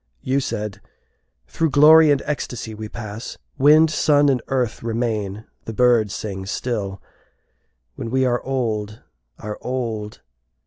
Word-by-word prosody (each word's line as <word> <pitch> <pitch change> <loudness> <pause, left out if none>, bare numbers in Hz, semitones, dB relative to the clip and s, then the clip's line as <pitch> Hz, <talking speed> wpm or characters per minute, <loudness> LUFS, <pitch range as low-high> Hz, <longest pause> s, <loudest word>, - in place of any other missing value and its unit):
You 135 +2 +1
said, 105 -6 -4 0.6
"Through 165 -1 -1
glory 155 +2 +7
and 145 -2 +2
ecstasy 125 -6 -4
we 110 0 -7
pass; 110 0 -7 0.2
Wind, 155 +3 +6
sun, 145 -2 +3
and 130 -3 +1
earth 125 -4 -1
remain, 110 -3 -3 0.2
the 115 - -5
birds 115 -3 +3
sing 95 -3 -5
still, 100 -4 -3 0.9
When 115 - -6
we 130 +2 +1
are 120 -1 +1
old, 110 -5 -3 0.3
are 105 0 -7
old. 115 -5 -4
120 Hz, 130 wpm, -21 LUFS, 105-135 Hz, 0.9 s, glory